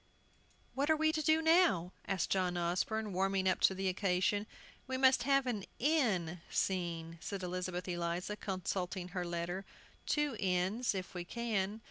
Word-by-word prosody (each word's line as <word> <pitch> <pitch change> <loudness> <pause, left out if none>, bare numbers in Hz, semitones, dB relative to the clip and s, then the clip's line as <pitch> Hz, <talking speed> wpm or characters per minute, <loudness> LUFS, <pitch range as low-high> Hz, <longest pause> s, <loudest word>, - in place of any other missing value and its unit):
"What 280 +3 0
are 315 - +6
we 315 0 +3
to 315 - -1
do 315 +2 +3
now?" 320 - +4 0.2
asked 190 -4 -1
John 180 -2 +1
Osborne, 190 +5 -1
warming 190 +1 +1
up 185 - +2
to 190 - +4
the 190 0 -1
occasion. 195 +2 +1 0.4
"We 260 0 -2
must 260 0 +5
have 275 -1 +4
an 225 -6 -2
'inn' 210 - +1
scene," 170 -3 -1
said 195 -2 -4
Elizabeth 180 0 -3
Eliza, 175 +3 -2
consulting 185 -2 -3
her 180 -1 -3
letter; 175 +2 -3 0.4
"two 295 -4 +1
inns, 195 +5 +1
if 185 0 -5
we 180 -1 -4
can." 215 0 -2
190 Hz, 155 wpm, -34 LUFS, 180-235 Hz, 0.4 s, are